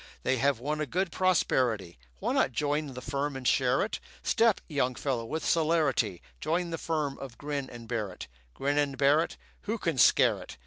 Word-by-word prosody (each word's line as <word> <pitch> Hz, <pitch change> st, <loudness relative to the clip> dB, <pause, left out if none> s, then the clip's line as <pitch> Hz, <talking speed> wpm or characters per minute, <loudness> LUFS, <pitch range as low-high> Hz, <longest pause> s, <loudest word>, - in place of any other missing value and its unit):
They 130 Hz, -, +2 dB
have 140 Hz, -1 st, +2 dB
won 150 Hz, +4 st, -2 dB
a 150 Hz, -, -1 dB
good 185 Hz, 0 st, -1 dB
prosperity; 125 Hz, -, +1 dB, 0.2 s
Why -, -, -1 dB
not 130 Hz, -, +2 dB
join 145 Hz, 0 st, -1 dB
the 125 Hz, -, -7 dB
firm 140 Hz, +1 st, -2 dB
and 130 Hz, -2 st, -3 dB
share -, -, +3 dB
it? -, -, -3 dB, 0.2 s
Step, 225 Hz, -2 st, +3 dB
young 130 Hz, -5 st, 0 dB
fellow, 125 Hz, -4 st, -2 dB
with 160 Hz, +7 st, -4 dB
celerity; 155 Hz, -, +1 dB, 0.2 s
Join 170 Hz, +1 st, -1 dB
the 165 Hz, -, -3 dB
firm 150 Hz, -4 st, -2 dB
of 130 Hz, -4 st, -8 dB
Grin 145 Hz, -2 st, -4 dB
and 120 Hz, -1 st, -10 dB
Barrett. 110 Hz, -6 st, -4 dB, 0.3 s
Grin 145 Hz, +2 st, 0 dB
and 140 Hz, -2 st, 0 dB
Barrett, 145 Hz, +4 st, +3 dB, 0.3 s
Who 225 Hz, -, +1 dB
can 165 Hz, -, -1 dB
scare -, -, +5 dB
it? -, -, -10 dB
140 Hz, 185 wpm, -29 LUFS, 125-160 Hz, 0.3 s, scare